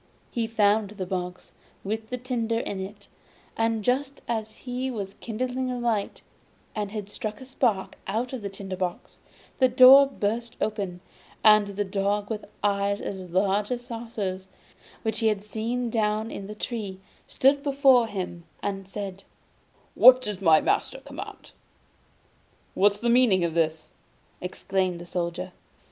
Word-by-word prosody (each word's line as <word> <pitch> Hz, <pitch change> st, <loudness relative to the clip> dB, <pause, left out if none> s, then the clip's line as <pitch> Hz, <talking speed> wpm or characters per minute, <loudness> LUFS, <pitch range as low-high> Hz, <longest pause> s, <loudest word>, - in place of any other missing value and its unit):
He 230 Hz, -3 st, -1 dB
found 210 Hz, -2 st, +2 dB
the 200 Hz, -3 st, -5 dB
box 180 Hz, -1 st, -5 dB, 0.3 s
with 220 Hz, +2 st, -3 dB
the 250 Hz, -, -3 dB
tinder 235 Hz, -2 st, -1 dB
in 205 Hz, -4 st, -3 dB
it; 200 Hz, +2 st, -8 dB, 0.5 s
but 225 Hz, -1 st, +1 dB
just 265 Hz, +4 st, 0 dB
as 220 Hz, -2 st, -3 dB
he 255 Hz, +1 st, -2 dB
was 200 Hz, -6 st, -5 dB
kindling 255 Hz, +3 st, -2 dB
a 250 Hz, -, -2 dB
light, 230 Hz, -4 st, -1 dB, 0.5 s
and 210 Hz, -2 st, -2 dB
had 205 Hz, -1 st, -6 dB
struck 215 Hz, -1 st, -5 dB
a 260 Hz, -, -10 dB
spark 240 Hz, -7 st, 0 dB
out 230 Hz, +6 st, -2 dB
of 255 Hz, -, -4 dB
the 200 Hz, -, -4 dB
tinder 195 Hz, -1 st, -6 dB
box, 180 Hz, -1 st, -4 dB, 0.4 s
the 260 Hz, -, +6 dB
door 260 Hz, +2 st, +9 dB
burst 230 Hz, -1 st, -2 dB
open, 195 Hz, -5 st, -2 dB, 0.4 s
and 215 Hz, -1 st, +7 dB
the 200 Hz, +1 st, -2 dB
dog 200 Hz, +2 st, -1 dB
with 215 Hz, -1 st, -4 dB, 0.2 s
eyes 200 Hz, 0 st, +1 dB
as 190 Hz, -2 st, -6 dB
large 195 Hz, +3 st, +1 dB
as 245 Hz, -1 st, -3 dB
saucers, 220 Hz, -6 st, -4 dB, 0.6 s
which 220 Hz, -1 st, -1 dB
he 225 Hz, -, +2 dB
had 210 Hz, -2 st, +1 dB
seen 230 Hz, +3 st, -2 dB
down 215 Hz, 0 st, 0 dB
in 195 Hz, -, -6 dB
the 210 Hz, -, -7 dB
tree, 210 Hz, -4 st, -4 dB, 0.3 s
stood 275 Hz, +2 st, +3 dB
before 270 Hz, -4 st, +4 dB
him 180 Hz, -5 st, -5 dB, 0.2 s
and 195 Hz, -1 st, -3 dB
said: 195 Hz, -1 st, -6 dB, 0.7 s
'What 255 Hz, 0 st, +9 dB
does 205 Hz, -4 st, -4 dB
my 160 Hz, -4 st, +6 dB
lord -, -, 0 dB
command?' -, -, -9 dB, 1.2 s
'What's 205 Hz, +1 st, +3 dB
the 235 Hz, -, -1 dB
meaning 235 Hz, -7 st, +4 dB
of 170 Hz, -1 st, 0 dB
this?' 160 Hz, -1 st, 0 dB, 0.5 s
exclaimed 185 Hz, -1 st, -1 dB
the 175 Hz, -, -8 dB
Soldier. 175 Hz, +1 st, -3 dB
210 Hz, 155 wpm, -26 LUFS, 195-235 Hz, 1.2 s, door